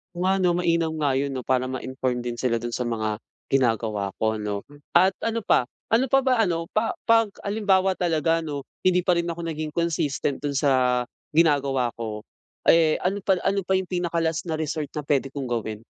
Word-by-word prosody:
Oo 175 - -5
nga 190 - +3
'no. 180 -2 +2
Mainam 170 -2 +1
nga 140 -3 +2
'yon 140 +1 -1
'no, 130 - -3
para 130 +1 +1
ma-inform 130 -1 -3
din 120 -1 -4
sila 120 -1 0
doon 120 +1 -5
sa 125 - -2
mga 110 -2 -1 0.3
ginagawa 110 -6 +1
ko, 110 0 +1
'no? 105 -1 -3 0.3
At 185 +2 +4
ano 230 0 0
pa, 190 - +3 0.2
ano 230 +3 +3
pa 270 - +4
ba 260 -1 +2
ano, 165 -3 -2
pa 220 +1 0 0.2
'pag 225 -2 +4
halimbawa 195 -2 +1
talaga 165 -1 +1
ano, 145 -2 -4 0.2
hindi 180 -1 +4
pa 180 0 +2
rin 170 0 0
ako 170 - -8
naging 155 -2 -4
consistent 150 -4 -1
dun 145 - 0
sa 130 -3 +2 0.3
ginagawa 140 -5 +3
ko, 110 -2 -5 0.5
eh, 165 -2 +5
ano 195 +2 -1
pa 190 -2 +2
ano 195 +1 0
pa 190 - -1
yung 190 -1 +1
pinaka-last 165 -2 -1
na 160 -2 -3
resort 155 -1 -3
na 150 - -3
pwede 140 -2 0
kong 140 -3 -4
gawin? 110 -2 -3
155 Hz, 195 wpm, -24 LUFS, 130-180 Hz, 0.5 s, eh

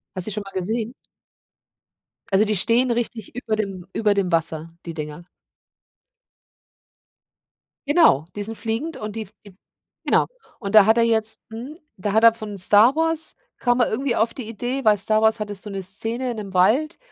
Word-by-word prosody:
Hast 185 -1 -2
du - - -1
die - - -2
schon 210 - -3
mal 195 - -7
gesehen? 220 +5 -3 1.4
Also 200 +3 +4
die 215 0 0
stehen 235 +7 +2
richtig 235 -2 -3
über 230 -3 -2
dem 195 -4 -4
über 210 -2 +2
dem 195 -3 -1
Wasser, 165 0 -1
die 165 - -5
Dinger. 150 +2 -7 2.6
Genau, 290 - +5
die 205 - -3
sind 225 +2 -5
fliegend 230 +9 -3
und 215 0 -6
die 225 - -2
f 205 -1 -12
die - - -12
f - - -22 0.5
genau, - - +3 0.3
und 200 -2 -5
da 210 -2 +8
hat 220 +2 +4
er - - +5
jetzt 220 -1 +1
mhm, 240 +7 -7 0.2
da 195 +2 -3
hat 220 +2 +3
er 230 0 +8
von 215 -3 -7
Star 205 +6 +5
Wars 325 0 -1 0.2
kam 245 0 +1
er 245 - +3
irgendwie 245 +2 -1
auf 225 +1 +1
die 245 -5 -7
Idee, 245 +4 -4
weil 215 -1 +5
Star 215 +2 +1
Wars 220 0 +3
hatte 210 -1 -4
so 200 +2 -6
'ne 195 -1 -4
Szene 225 +7 -1
in 235 - -5
'nem 200 -3 -7
Wald, 245 - +2
220 Hz, 195 wpm, -22 LUFS, 195-235 Hz, 2.6 s, da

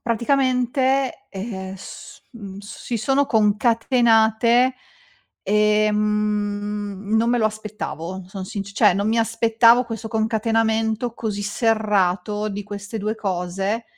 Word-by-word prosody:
praticamente, 260 +2 0
ehm, 190 -2 -6
s - - -11
mhmm, 200 -4 -9
s 205 0 -10
si 240 - -2
sono 270 +5 +1
concatenate, 230 +2 +3 0.7
ehm, 210 -1 0
non 230 +1 +2
me 245 - +2
lo 220 - +1
aspettavo, 210 -4 -6
son 190 -1 -6
sinc 200 -2 -6
cioè 190 - +4
non 200 +2 0
mi 230 - +1
aspettavo 230 +1 +4
questo 225 -1 -6
concatenamento 220 +1 0
così 210 -3 -4
serrato 210 -2 0
di 205 0 -5
queste 205 +1 -7
2 215 +1 -2
cose. 195 +1 -2
215 Hz, 115 wpm, -22 LUFS, 205-230 Hz, 0.7 s, cioè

